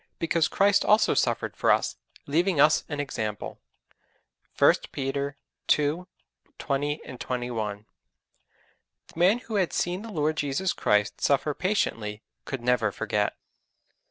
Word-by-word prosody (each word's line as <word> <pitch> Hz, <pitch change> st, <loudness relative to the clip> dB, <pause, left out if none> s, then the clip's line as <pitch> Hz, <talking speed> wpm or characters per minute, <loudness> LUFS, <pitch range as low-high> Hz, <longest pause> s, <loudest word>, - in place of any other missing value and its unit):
because 165 Hz, -1 st, +1 dB
Christ 200 Hz, 0 st, +3 dB
also 215 Hz, +1 st, +4 dB
suffered -, -, 0 dB
for -, -, 0 dB
us, -, -, +2 dB, 0.3 s
leaving 170 Hz, +3 st, +1 dB
us 150 Hz, +2 st, +5 dB
an 150 Hz, -2 st, -4 dB
example._' 110 Hz, -7 st, -4 dB, 1.0 s
(1 -, -, +7 dB, 0.2 s
Peter 140 Hz, +1 st, -3 dB, 0.4 s
ii. 150 Hz, +4 st, -1 dB, 0.5 s
20, 145 Hz, +1 st, -1 dB, 0.2 s
21.) 115 Hz, -5 st, -3 dB, 1.3 s
The -, -, -9 dB
man 185 Hz, +6 st, +5 dB
who 220 Hz, -2 st, -2 dB
had 185 Hz, -3 st, +1 dB
seen 180 Hz, +2 st, -1 dB
the 225 Hz, -, -8 dB
Lord 155 Hz, -3 st, 0 dB
Jesus 145 Hz, +6 st, 0 dB
Christ 105 Hz, +1 st, +1 dB
suffer 145 Hz, +1 st, +2 dB
patiently 115 Hz, -, -1 dB, 0.2 s
could 135 Hz, -3 st, -5 dB
never 120 Hz, -4 st, +2 dB
forget. 105 Hz, 0 st, -1 dB
145 Hz, 125 wpm, -26 LUFS, 120-175 Hz, 1.3 s, 1